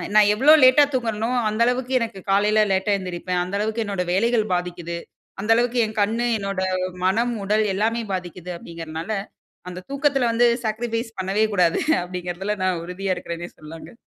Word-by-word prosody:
நான் 210 -1 +6
எவ்வளோ 270 +8 +6
லேட்டா 255 +3 +7
தூங்குறனோ 225 -3 -1 0.2
அந்த 215 +2 -2
அளவுக்கு 250 +1 -1
எனக்கு 225 -5 -4
காலையில 210 +2 +3
லேட்டா 190 +2 0
எழுந்திரிப்பேன். 180 -1 -3
அந்த 185 +2 -5
அளவுக்கு 220 +2 -1
என்னோட 200 -3 -2
வேலைகள் 225 +3 +2
பாதிக்கிது. 175 -1 -4 0.4
அந்த 210 +3 0
அளவுக்கு 245 +1 +1
என் 215 0 -7
கண்ணு 225 +4 +1
என்னோட 195 -1 -3 0.4
மனம், 230 +6 +1
உடல் 210 +2 +2
எல்லாமே 225 +4 0
பாதிக்கிது 180 -1 -5
அப்டிங்குதுனால 165 +2 -7 0.6
அந்த 180 0 -8
தூக்கத்தில 275 -3 +1
வந்து 240 +1 +4 0.2
சாக்ரிஃபைஸ் 225 +1 -3
பண்ணவே 195 +3 +1
கூடாது. 175 -4 +3 0.2
அப்டிங்குறதுல 180 +3 -4
நான் 185 -3 0
உறுதியா 185 +2 -2
இருக்கிறேனே 175 -1 -6
சொல்லாங்க. 160 +8 -11
205 Hz, 155 wpm, -22 LUFS, 180-230 Hz, 0.6 s, லேட்டா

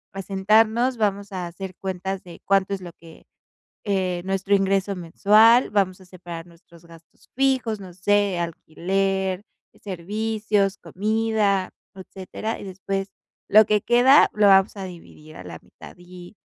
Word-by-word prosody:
a 195 - -4
sentarnos. 220 +6 +2
Vamos 200 -2 -1
a 180 -2 -4
hacer 185 +2 -8
cuentas 190 0 -5
de 175 -2 -13
cuánto 195 0 +1
es 190 - -10
lo 175 -1 -9
que, 165 -1 -16 0.6
eh, 185 -3 -1
nuestro 195 +1 0
ingreso 195 0 +1
mensual. 210 +7 +4
Vamos 195 -2 0
a - - -16
separar 175 -2 -9
nuestros 170 0 -20
gastos 165 -1 -19
fijos, 260 -5 0
no 185 -2 -11
sé, 200 0 +1
alquiler, 190 +3 -2 0.4
servicios, 205 +1 -2
comida, 210 -1 -1 0.2
etcétera. 195 +3 -7
Y - - -9
después, 195 +1 -4 0.4
lo 215 +1 +7
que 210 0 +1
queda, 245 +6 +5
lo 210 -1 +4
vamos 195 +1 +4
a 195 - -6
dividir 165 -3 -12
a 90 - -10
la 85 -2 -9
mitad. - - -15
Y, 175 +2 -14
195 Hz, 145 wpm, -23 LUFS, 180-210 Hz, 0.6 s, lo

